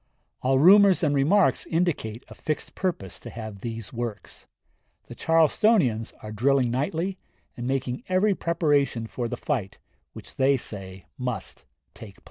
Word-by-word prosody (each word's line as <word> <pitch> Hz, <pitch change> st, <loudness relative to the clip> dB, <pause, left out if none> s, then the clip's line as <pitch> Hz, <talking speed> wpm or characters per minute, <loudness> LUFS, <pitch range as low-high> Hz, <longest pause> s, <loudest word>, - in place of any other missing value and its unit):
All 130 Hz, +1 st, +2 dB
rumors 190 Hz, +5 st, +6 dB
and 145 Hz, -2 st, +2 dB
remarks 160 Hz, +9 st, +3 dB
indicate 155 Hz, -10 st, -1 dB
a -, -, -11 dB
fixed 155 Hz, 0 st, -4 dB
purpose 165 Hz, -, -3 dB
to -, -, -9 dB
have 110 Hz, -3 st, -8 dB
these 115 Hz, +1 st, -6 dB
works. 120 Hz, -3 st, -6 dB, 0.6 s
The -, -, -11 dB
Charlestonians 160 Hz, -, +2 dB
are 110 Hz, -, -7 dB
drilling 125 Hz, +3 st, +2 dB
nightly, 165 Hz, +9 st, -2 dB, 0.4 s
and 120 Hz, -, -5 dB
making 130 Hz, -1 st, -2 dB
every 190 Hz, +3 st, +3 dB
preparation 145 Hz, -9 st, +1 dB
for 120 Hz, +1 st, -4 dB
the 125 Hz, +1 st, -5 dB
fight 120 Hz, -11 st, -3 dB, 0.4 s
which -, -, -12 dB
they 135 Hz, +1 st, +3 dB
say 95 Hz, -5 st, -7 dB
must 125 Hz, -6 st, -5 dB, 0.3 s
take 105 Hz, -4 st, -11 dB
place. -, -, -22 dB
130 Hz, 145 wpm, -25 LUFS, 115-165 Hz, 0.6 s, rumors